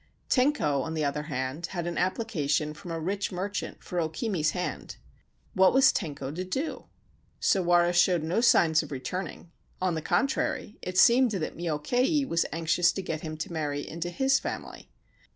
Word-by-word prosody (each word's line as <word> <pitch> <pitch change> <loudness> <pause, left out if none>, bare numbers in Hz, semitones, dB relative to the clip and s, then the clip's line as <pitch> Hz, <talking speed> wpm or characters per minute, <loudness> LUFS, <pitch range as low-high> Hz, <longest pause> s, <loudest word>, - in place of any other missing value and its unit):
Tenko, 250 - +2
on 160 +4 -4
the 155 -2 0
other 145 +1 -1
hand, 130 +4 -3
had 170 - -2
an 175 0 -3
application 155 -6 0
from 165 +3 -11
a 165 -1 -3
rich 195 +5 -2
merchant 195 +3 -4
for 180 - -3
O 160 - -1
Kimi's 165 -2 -1
hand. 180 -1 -4 0.6
What 190 +2 +4
was 265 0 +6
Tenko 145 -6 -4
to 180 +3 -3
do? 265 - -3 0.5
Sawara 175 -2 +3
showed 175 -2 +3
no 170 +8 0
signs 160 -9 +5
of - - -9
returning; 170 +5 -5 0.3
on 185 -1 0
the 160 - -2
contrary, 265 - -1
it 185 0 -4
seemed 245 +5 +6
that 190 -7 -3
Myokei 245 - 0
was 165 -6 +1
anxious 165 +2 +2
to 195 - -4
get 160 -3 -4
him 155 -1 -6
to 160 +2 -5
marry 145 -3 -3
into 170 +2 -4
his 265 +9 +2
family. - - -7
175 Hz, 170 wpm, -28 LUFS, 155-195 Hz, 0.6 s, was